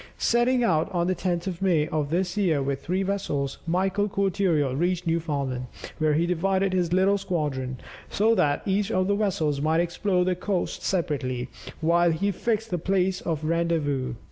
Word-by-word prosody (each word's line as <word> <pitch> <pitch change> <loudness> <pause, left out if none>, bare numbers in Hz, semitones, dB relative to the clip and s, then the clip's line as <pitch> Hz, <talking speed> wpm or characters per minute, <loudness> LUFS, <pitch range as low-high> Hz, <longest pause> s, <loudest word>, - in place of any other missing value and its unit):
Setting 240 +1 +2
out 160 -8 +1
on 175 -2 0
the 185 - +1
10th 175 -1 -2
of 185 -2 -4
May 170 -6 +2
of 150 -2 -1
this 180 +4 -1
year 180 -8 +2
with 135 0 -3
three 185 +3 0
vessels, 150 -9 -2
Michael 190 +4 +1
Cortereal 190 -8 +1
reached 175 +3 0
Newfoundland, 140 -6 -1 0.3
where 155 -1 +2
he 165 +3 +2
divided 190 +2 +1
his 175 -2 +1
little 190 +2 +3
squadron, 145 -9 -2 0.3
so 220 +3 +3
that 150 -9 +1
each 200 +1 +1
of 185 0 +1
the 200 - +1
vessels 165 -9 0
might 160 +2 +2
explore 180 +2 +1
the 185 - +2
coasts 180 +1 -2
separately, 140 -9 -1 0.3
while 170 +2 +3
he 195 +6 0
fixed 225 +2 -2
the 175 - 0
place 185 +1 0
of 160 -3 -3
rendezvous. 155 -6 0
175 Hz, 170 wpm, -26 LUFS, 155-195 Hz, 0.3 s, little